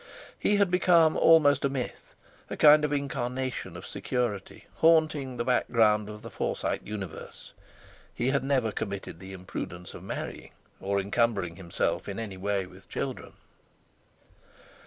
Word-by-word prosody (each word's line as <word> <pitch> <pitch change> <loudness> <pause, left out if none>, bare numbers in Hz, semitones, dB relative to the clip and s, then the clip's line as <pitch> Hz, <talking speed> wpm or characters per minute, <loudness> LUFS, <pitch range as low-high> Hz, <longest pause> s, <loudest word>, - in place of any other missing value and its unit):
He 205 - +2
had 200 -3 +3
become 170 -3 +4
almost 145 -4 +5
a 140 - +2
myth—a 130 -3 -7
kind 150 0 +7
of 150 - 0
incarnation 130 -2 -3
of - - -9
security 120 -6 -3
haunting 155 -5 +3
the 120 - -2
background 110 -4 +2
of 105 0 -9
the - - -8
Forsyte - - -2
universe. 100 -6 -8 0.6
He 125 - -1
had 140 -1 +1
never 130 -5 +1
committed 100 -5 -5
the 95 +1 -9
imprudence 90 -1 -7
of - - -9
marrying, - - -6 0.3
or 100 +1 0
encumbering 100 -3 0
himself 90 +1 -2
in 100 - -5
any 110 -4 -5
way 100 0 -1
with 95 +1 -16
children. - - -5
120 Hz, 135 wpm, -28 LUFS, 100-140 Hz, 0.6 s, kind